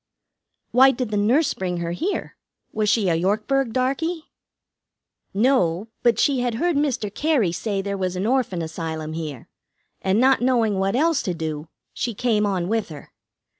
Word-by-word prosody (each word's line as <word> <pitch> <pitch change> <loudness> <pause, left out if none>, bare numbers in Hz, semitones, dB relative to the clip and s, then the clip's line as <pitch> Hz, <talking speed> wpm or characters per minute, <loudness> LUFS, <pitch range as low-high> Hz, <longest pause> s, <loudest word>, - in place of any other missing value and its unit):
"Why 260 +2 +7
did 250 -3 -2
the - - -1
nurse 245 +10 +2
bring 180 -2 -3
her 170 0 -3
here? 345 - -3 0.4
Was 215 -1 0
she 205 -2 +2
a 170 - +3
Yorkburg 215 +9 0
darkey?" 275 +7 -1 1.1
"No; 210 -4 +1
but 235 -3 +3
she 270 +2 +2
had 245 -2 -1
heard 345 +7 0
Mr. 255 -8 -1
Cary 285 - +1
say 195 +3 -2
there 200 0 -3
was 185 -1 -1
an 185 +2 -2
Orphan 235 -8 0
Asylum 160 -1 -5
here, 155 -6 -6 0.5
and 195 +2 +1
not 265 +1 +4
knowing 230 -6 +2
what 195 +3 0
else 315 +2 +2
to 180 - -3
do, 155 -1 -4 0.3
she 235 -3 -3
came 215 -2 +1
on 185 -3 -1
with 220 -1 -1
her. 150 -3 -11
210 Hz, 170 wpm, -23 LUFS, 180-255 Hz, 1.1 s, Why